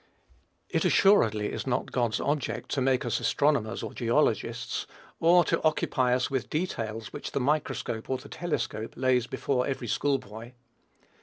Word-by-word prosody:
It, - - 0
assuredly, 110 - +4
is - - -4
not 125 0 -1
God's 120 -3 0
object 125 -6 -2
to 135 - 0
make 130 -1 +2
us 115 -1 0
astronomers 140 -7 +1
or - - -5
geologists; 120 -1 0 0.3
or 175 +2 +6
to - - 0
occupy 130 -5 +2
us 125 +1 -1
with 130 -2 -2
details 115 -10 -3
which - - -6
the - - 0
microscope 130 -5 -1
or 130 - 0
the - - -12
telescope 155 -9 -3
lays 125 -1 +2
before 125 -1 -1
every 130 -3 -3
school 140 +5 +1
boy. 115 +2 -10
125 Hz, 155 wpm, -28 LUFS, 115-145 Hz, 0.3 s, or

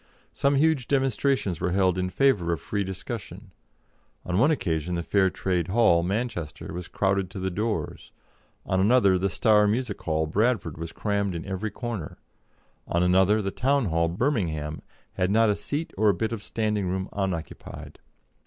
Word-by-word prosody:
Some 140 0 +2
huge 145 -3 +2
demonstrations 135 - +1
were 90 - 0
held 95 -2 +3
in 90 0 -1
favour 100 -8 +2
of 85 - -1
free 100 +8 -2
discussion; 95 +4 -7 0.7
on 90 +1 0
one 140 +7 +5
occasion 90 - -1
the 85 - -2
Free 95 +2 +2
Trade 90 -2 -1
Hall, 95 -4 +4
Manchester, 95 - -3
was 90 -1 -6
crowded 95 -1 0
to 95 - -7
the 95 0 -2
doors; 105 -4 -3 0.5
on 95 - 0
another 100 -2 +4
the 100 +2 +1
Star 105 +2 +4
Music 120 +5 -1
Hall, 80 -1 0
Bradford, 100 -2 0
was 85 0 -5
crammed 100 -3 -1
in 80 - -5
every 95 +3 -3
corner; 115 -9 -5 0.7
on 85 +1 +1
another 95 +4 +4
the 95 - -2
Town 135 -2 +1
Hall, 85 +1 +1
Birmingham, 85 - -1 0.3
had 90 - 0
not 110 +1 +4
a - - 0
seat 150 +8 -4
or 110 -1 +5
a 100 - +3
bit 110 +6 -2
of 115 -3 -4
standing 105 -3 -1
room 95 +1 -2
unoccupied. 95 -5 -5
95 Hz, 170 wpm, -26 LUFS, 90-115 Hz, 0.7 s, one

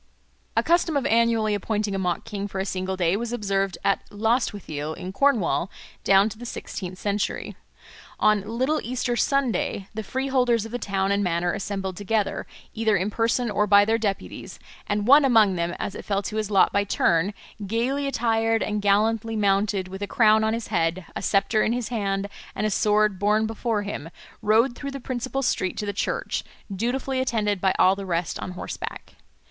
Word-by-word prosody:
A - - +4
custom 335 -3 +2
of 275 - -1
annually 230 -2 +2
appointing 205 0 -1
a 195 - -1
mock 180 -2 -1
king 205 -3 -4
for 195 - -7
a 190 - -1
single 190 -1 -3
day 175 0 +2
was 235 +2 -3
observed 195 -5 -1
at 195 - +2
Lostwithiel 205 - -1
in 185 +1 -7
Cornwall 225 -9 +2 0.3
down 195 +1 +5
to 215 - -11
the 240 - -7
sixteenth 185 -5 -6
century. 205 +1 -2 0.6
On 215 -1 +4 0.2
"little 280 +5 +1
Easter 245 0 -2
Sunday" 245 -6 0
the 220 - -3
freeholders 250 -1 +1
of 225 - -8
the 245 - -3
town 195 -2 -1
and 200 0 +1
manor 175 -1 0
assembled 195 -2 -4
together, 205 0 -1 0.3
either 220 -2 +2
in 190 +4 -1
person 230 +1 0
or 210 +1 +1
by 200 0 +6
their 225 +1 +1
deputies, 200 -3 -4 0.3
and 205 0 0
one 285 +5 +7
among 225 -7 +5
them, 170 0 -2
as - - -4
it - - -8
fell 200 -1 -1
to 215 +2 -4
his 215 -1 -1
lot 195 -3 +4
by 200 - +3
turn, 175 -1 +2 0.4
gaily 255 +7 0
attired 225 -3 +1
and 210 -1 -2
gallantly 220 +3 +2
mounted, 200 -2 +1
with 190 +1 -8
a 205 - -2
crown 220 -1 +4
on 220 +1 +1
his 230 - -6
head, 170 -2 0
a - - -3
sceptre 200 +2 +2
in 225 - +2
his 245 -2 -3
hand, 200 -4 -1 0.3
and 210 - -1
a 215 - +1
sword 210 -1 +2
borne 210 +2 +2
before 225 -1 -1
him, 200 -6 -5 0.3
rode 225 +4 +3
through 280 - -5
the 275 0 -6
principal 255 +1 -3
street 185 -6 0
to 210 - -2
the 205 - -2
church, 200 - -2 0.3
dutifully 260 +5 -1
attended 210 -6 0
by 190 - +3
all 190 +1 +5
the 200 - -6
rest 170 -1 -1
on 185 - -5
horseback. - - -7
210 Hz, 190 wpm, -24 LUFS, 195-230 Hz, 0.6 s, one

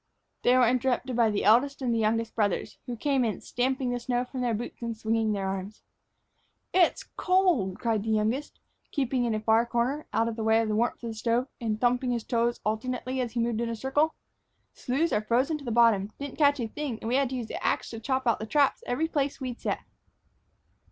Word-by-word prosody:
They 250 +1 +4
were 250 -2 +5
interrupted 255 +1 0
by 230 -2 +4
the 205 -1 -1
eldest 250 +7 +4
and 250 -3 0
the 230 - +1
youngest 225 +1 0
brothers, 205 -4 -1
who 245 - -3
came 270 +1 +1
in, 220 -3 -1
stamping 255 0 -1
the 245 - -1
snow 245 0 -1
from 255 0 -6
their 240 -2 +1
boots 240 +3 -6
and 230 -1 -4
swinging 220 0 0
their 200 -2 -1
arms. 195 +2 -5 0.9
"Gee! 375 - +3
it's 350 - +3
cold!" 355 - +2
cried 225 -3 0
the 220 - -4
youngest, 220 +7 0 0.3
keeping 260 -3 0
in 230 -2 0
a - - -1
far 220 +1 +3
corner, 245 +6 -1
out 225 +1 +1
of 230 0 -4
way 220 0 +3
of 225 -1 0
the 210 - 0
warmth 235 +3 0
from 235 - -4
the - - -4
stove, 235 +3 0
and 215 -2 -1
thumping 250 +1 +1
his 235 -2 -1
toes 235 +1 0
alternately 255 +4 -2
as 240 -3 -3
he 240 - -1
moved 230 -1 0
in 235 - -1
a 230 - -2
circle. 280 +7 +1 0.6
"Sloughs 285 +7 -1
are 210 - +2
frozen 255 +8 +1
to 280 - -11
the - - -3
bottom. 220 -3 +4
Didn't 285 +1 -7
catch 285 -1 +4
a 235 - -1
thing, 275 0 -4
and 230 +2 -1
had 270 -1 +2
to 260 - -4
use 245 -2 -3
the - - -6
ax - - 0
to 225 - -6
chop 260 +3 -1
out 235 - +2
the 220 - -5
traps 285 +2 +2
every 300 +7 0
place 285 -3 -1
we'd 255 -3 -5
set." - - -2
240 Hz, 225 wpm, -28 LUFS, 225-260 Hz, 0.9 s, were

